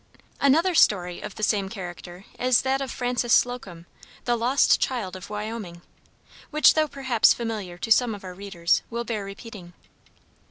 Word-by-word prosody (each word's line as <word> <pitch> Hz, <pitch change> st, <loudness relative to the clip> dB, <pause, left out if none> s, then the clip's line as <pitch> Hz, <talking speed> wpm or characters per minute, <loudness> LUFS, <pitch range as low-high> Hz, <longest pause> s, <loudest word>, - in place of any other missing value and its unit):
Another 325 Hz, +7 st, +3 dB
story 180 Hz, -, +2 dB
of -, -, -7 dB
the 215 Hz, -, -7 dB
same 200 Hz, -3 st, +1 dB
character 180 Hz, -1 st, -9 dB
is 255 Hz, -1 st, +3 dB
that 270 Hz, +1 st, 0 dB
of 270 Hz, -, -3 dB
Frances 245 Hz, -1 st, -2 dB
Slocum, 195 Hz, -9 st, 0 dB, 0.4 s
the 240 Hz, -, +2 dB
"Lost 245 Hz, +4 st, +3 dB
child 220 Hz, -8 st, -2 dB
of 185 Hz, -, -10 dB
Wyoming," 210 Hz, -5 st, -6 dB, 0.7 s
which 305 Hz, 0 st, +5 dB
though 310 Hz, -1 st, +2 dB
perhaps 260 Hz, -5 st, +2 dB
familiar 215 Hz, -7 st, -5 dB
to 225 Hz, -, -5 dB
some 230 Hz, -1 st, +4 dB
of 200 Hz, -, -12 dB
our 185 Hz, -1 st, -7 dB
readers, 180 Hz, -3 st, 0 dB
will 235 Hz, 0 st, -3 dB
bear 220 Hz, -3 st, -4 dB
repeating. 195 Hz, -2 st, -10 dB
220 Hz, 160 wpm, -25 LUFS, 190-245 Hz, 0.7 s, which